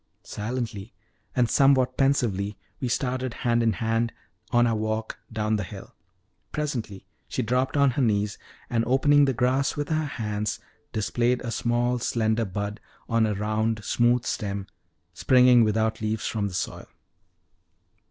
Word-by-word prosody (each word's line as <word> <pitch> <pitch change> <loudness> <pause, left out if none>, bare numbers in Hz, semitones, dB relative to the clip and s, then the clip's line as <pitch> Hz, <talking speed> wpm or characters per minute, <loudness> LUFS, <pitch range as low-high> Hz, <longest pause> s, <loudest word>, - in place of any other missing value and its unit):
Silently, 110 -2 -5 0.4
and 125 -2 +3
somewhat 130 -1 +4
pensively, 105 -8 +1 0.2
we 130 - -2
started 125 +1 -1
hand 120 -1 +3
in 115 -2 +2
hand 115 +2 0 0.4
on 120 0 +4
our 115 - +2
walk 110 +1 -3
down 110 0 0
the 105 - -2
hill. 85 - -10 0.6
Presently 125 -10 -4 0.2
she 130 - -2
dropped 125 +5 0
on 140 -2 +5
her 130 - -1
knees, 105 -4 +1 0.3
and 115 -1 0
opening 145 +3 +4
the 135 - +1
grass 130 +3 +1
with 145 0 -2
her 155 -1 +1
hands, 105 -5 -3 0.3
displayed 120 +3 0
a 120 - -3
small, 120 +1 0
slender 110 -1 0
bud, 100 +2 -4 0.3
on 115 -1 +2
a 105 - -1
round, 110 +1 -1
smooth 120 0 +2
stem, 100 -3 -3 0.5
springing 125 +3 +5
without 110 0 0
leaves 110 0 -2
from 105 -3 -1
the 95 - -6
soil. - - -4
115 Hz, 145 wpm, -26 LUFS, 110-125 Hz, 0.6 s, on